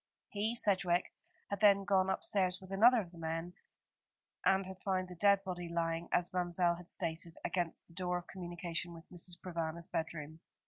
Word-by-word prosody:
He, 215 +3 -1
Sedgewick, 185 -6 +4 0.4
had 200 - -2
then 200 -1 +6
gone 190 -1 +3
upstairs 185 -1 +2
with 190 0 -13
another 230 +5 +6
of 175 -4 -10
the 170 - -13
men, 165 +2 -3 0.9
and 195 0 +3
had 190 0 -9
found 185 -2 -1
the - - -7
dead 200 +2 +4
body 175 -2 -5
lying, 165 0 -1
as 175 +1 +1
Ma'mselle 175 -1 +1
had 175 0 -13
stated, 165 -1 -4
against 175 -3 -2
the - - -16
door 180 0 -1
of 175 - -7
communication 175 -2 -4
with 165 - -13
Mrs. 175 0 -3
Provana's 170 -2 -4
bedroom. 160 -1 -4
180 Hz, 175 wpm, -34 LUFS, 170-190 Hz, 0.9 s, then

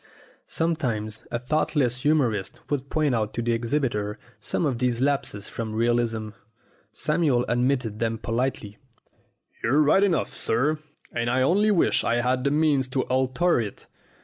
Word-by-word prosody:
Sometimes 120 -10 -2
a - - -1
thoughtless 130 -1 0
humorist 125 -11 +1
would 140 -1 -2
point 150 -4 +1
out 110 -2 -1
to 120 - -1
the 120 - 0
exhibitor 115 -3 -1 0.2
some 160 - -1
of 130 -5 -1
these 125 -2 0
lapses 135 -7 -1
from 110 -2 -5
realism. 115 -1 0 0.6
Samuel 150 -1 +1
admitted 120 -3 0
them 115 -1 0
politely. 115 -2 -3 0.8
"You're 145 +6 +3
right 155 +7 +4
enough, 175 -8 +1
sir, 145 +7 0 0.3
and 120 0 -1
I 130 +1 +2
only 200 +9 +3
wish 195 -5 +3
I 115 - +1
had 125 +1 +1
the - - +4
means 145 -3 +2
to 130 0 -1
alter 130 +6 +1
it. 105 -3 -7
125 Hz, 150 wpm, -25 LUFS, 115-145 Hz, 0.8 s, right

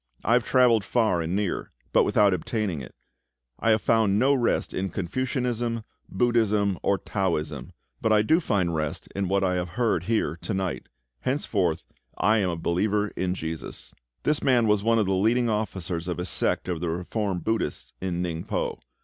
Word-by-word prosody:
I 115 - +2
have 120 0 +4
travelled 120 -5 +4
far 105 -4 +1
and 85 +3 -2
near, 100 -2 -1 0.2
but - - +5
without 100 -2 +4
obtaining 90 - -2
it. 65 - -11 0.6
I 115 - +1
have 110 -1 +3
found 110 -3 +3
no 135 +5 +4
rest 125 -4 0
in 95 +1 -2
Confucianism, 120 - -2 0.3
Buddhism, 105 -3 +2
or 100 - +2
Taoism; 75 - -2 0.3
but 110 - +1
I 105 -1 +5
do 160 +10 +4
find 100 - 0
rest 75 -2 -3
in 100 -1 -1
what 95 +1 +1
I 90 -1 +2
have 90 0 -2
heard 110 -8 +1
here 105 -7 0
to 110 - -3
night. 95 -3 -3 0.3
Henceforth 95 - -1 0.3
I 110 +1 +3
am 95 -3 +1
a 85 - -2
believer 105 +5 0
in 90 -1 -2
JESUS." 80 -2 -6 0.3
This 150 0 +2
man 125 -3 +3
was 105 -2 +3
one 115 +2 +3
of 110 - +3
the 95 - +1
leading 115 +5 +2
officers 95 -5 -3
of 90 - -2
a 90 - -3
sect 90 - 0
of 90 -2 -3
reformed 90 +3 -2
Buddhists 110 -9 -2
in 90 -1 -2
Ningpo. 85 -2 -3
100 Hz, 175 wpm, -26 LUFS, 90-115 Hz, 0.6 s, but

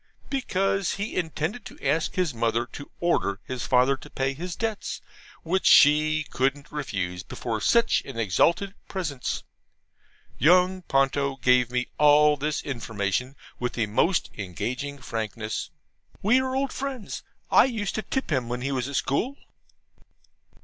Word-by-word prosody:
because 195 -8 0
he 200 +2 -4
intended 165 +5 -2
to - - -11
ask 155 +4 +1
his 180 -4 +1
mother 115 0 0
to 145 +3 -10
order 105 - +1
his 130 -2 -4
father 130 +2 +4
to - - -13
pay 135 0 -1
his 175 +5 -5
debts, 220 -2 -3 0.4
which 185 +3 +1
she 155 +1 +6
couldn't 140 +3 -1
refuse 95 -12 -3
before 110 +3 -4
such 235 0 +3
an 135 -4 -9
exalted 170 - +2
presence. 150 -9 -3 1.0
Young 180 +3 +4
Ponto 135 -2 +1
gave 125 -1 +3
me 125 0 0
all 150 0 +6
this 150 +1 -2
information 115 0 -2 0.2
with 125 0 -2
the 115 - 0
most 165 - +1
engaging 120 +9 -4
frankness. 110 -3 -4 0.5
We 230 +6 +5
are 260 0 -2
old 270 0 -1
friends. 265 -5 -5 0.3
I - - +7
used 225 -6 -2
to 220 - -1
tip 265 - -3
him 130 -5 0
when 125 0 -3
he 135 +2 -2
was 130 -2 -1
at 140 - -5
school. 235 - 0
145 Hz, 145 wpm, -26 LUFS, 125-185 Hz, 1.0 s, I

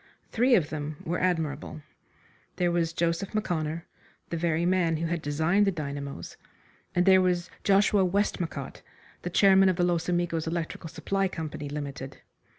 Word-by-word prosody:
Three 245 +2 +4
of 160 -7 +1
them 150 -1 -4
were 175 +2 -1
admirable. 155 -4 -2 0.7
There 180 -1 +1
was 170 -1 +1
Joseph 170 +5 -1
M'Conner, 165 -5 -2 0.5
the - - -1
very 165 0 0
man 175 -3 +2
who 165 - -2
had 170 0 -2
designed 160 +8 +2
the - - +3
dynamos, 140 - -6 0.6
and 180 - +3
there 190 -1 +7
was 180 -1 0
Joshua 200 0 +4
Westmacott, 180 -7 -2 0.4
the 175 - -4
chairman 195 +1 +5
of 185 - +1
the 175 - +1
Los 175 -1 0
Amigos 175 -2 0
Electrical 165 0 -4
Supply 195 +4 -1
Company, 155 -4 -5
Limited. 140 -2 -6
170 Hz, 155 wpm, -27 LUFS, 155-185 Hz, 0.7 s, there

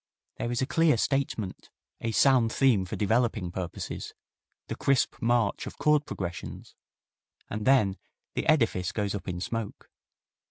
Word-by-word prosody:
There 120 - -2
is 120 +2 0
a - - +1
clear 165 -2 +3
statement, 115 -7 -2 0.3
a 115 - -2
sound 125 -1 +4
theme 120 -9 +3
for 90 - -5
developing 110 -3 +1
purposes, 90 -1 -5 0.5
the - - -4
crisp 135 -2 +1
march 120 -3 +1
of - - -8
chord 150 -1 +3
progressions, 90 -2 -6 0.8
and 105 +2 -3
then 110 -8 +4 0.4
the - - -2
edifice 115 - +2
goes 100 -2 -2
up 100 - -5
in 90 -2 -3
smoke. 115 +2 -5
115 Hz, 145 wpm, -28 LUFS, 100-130 Hz, 0.8 s, sound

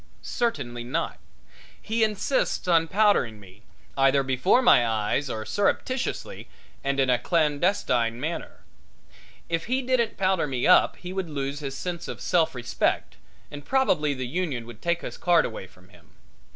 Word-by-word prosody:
Certainly 135 - -2
not. 120 - -3 0.6
He 225 +1 0
insists 215 0 0
on 165 -2 +3
powdering 190 - +2
me, 100 0 -16 0.3
either 135 0 +3
before 135 - +2
my 125 - +6
eyes 115 +5 -1
or 110 -1 -4
surreptitiously 255 - -2 0.4
and 140 0 -1
in 130 -1 +3
a 125 - +2
clandestine 150 - +1
manner. 160 +5 -5 0.9
If 165 0 -2
he 260 +2 0
didn't 245 -3 0
powder 190 -4 +1
me 130 -3 -2
up 180 - +5
he 180 0 -8
would 190 -3 -3
lose 140 -1 -3
his 135 -2 -5
sense 175 -2 -5
of - - -6
self 165 -4 +1
respect, 120 -1 -1 0.3
and 145 0 -8
probably 155 - +1
the 130 -1 -4
union 140 -4 -3
would 120 - -12
take 170 0 0
his - - -6
card 175 -2 +4
away 110 -4 -6
from 90 0 -22
him. - - -20
150 Hz, 155 wpm, -25 LUFS, 125-185 Hz, 0.9 s, my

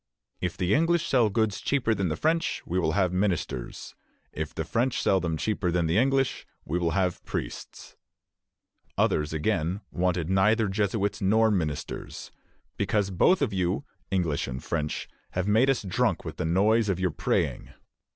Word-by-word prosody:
"If 90 -2 -3
the 90 +1 +1
English 165 +3 +2
sell 120 -5 +3
goods 110 -1 0
cheaper 130 -5 +1
than 95 -4 -1
the 75 - -1
French, 165 +1 0
we 90 +2 -1
will 80 -3 +1
have 95 -2 +1
ministers; 90 -10 -2 0.4
if - - -4
the - - -4
French 120 +2 0
sell 95 - +3
them 85 -3 -2
cheaper 105 -1 -1
than 85 -1 +1
the 80 +6 +2
English, 135 +1 +1 0.2
we 85 +4 -1
will 85 +1 0
have 90 -2 0
priests." - - -6 1.0
Others, 75 0 +1
again, 85 +3 -1
wanted 90 -2 0
neither 105 +4 +3
Jesuits 100 +2 -1
nor 110 +3 +4
ministers, 80 -8 -3 0.5
"because 100 0 0
both 145 - +3
of 115 -7 -1
you 90 -2 -1 0.2
[English 85 -6 0
and 65 +1 -5
French] 75 -2 -2 0.3
have 90 +1 -1
made 110 +6 +4
us 135 -5 +1
drunk 95 - 0
with - - -6
the - - -2
noise 105 +6 +3
of 95 -2 0
your 90 -2 +1
praying." - - -1
95 Hz, 165 wpm, -27 LUFS, 85-110 Hz, 1.0 s, nor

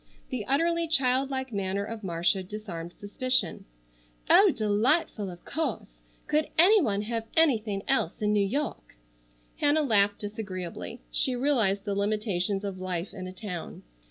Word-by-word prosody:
The 235 -6 -3
utterly 335 +4 +2
child 270 -3 +2
like 265 -2 -4
manner 200 0 -1
of 225 0 -7
Marcia 175 +1 +1
disarmed 185 -4 -7
suspicion. 255 +5 0 0.7
"Oh, 400 0 +8
delightful, 215 - +1
of 175 -1 -11
course. 260 - -3 0.3
Could 305 0 +1
any 395 +6 +7
one 205 -7 0
have 225 0 -3
anything 220 -11 +2
else 270 - +1
in 210 -1 +1
New 205 -1 +3
York?" 255 - -3 0.6
Hannah 295 +1 +3
laughed 205 -5 +3
disagreeably. 205 +1 -6
She 255 - +1
realized 230 -7 +1
the 205 - -1
limitations 200 -1 -1
of 195 -2 -5
life 185 -1 -4
in 185 -1 -7
a - - -6
town. 185 -3 -7
210 Hz, 145 wpm, -28 LUFS, 195-265 Hz, 0.7 s, Oh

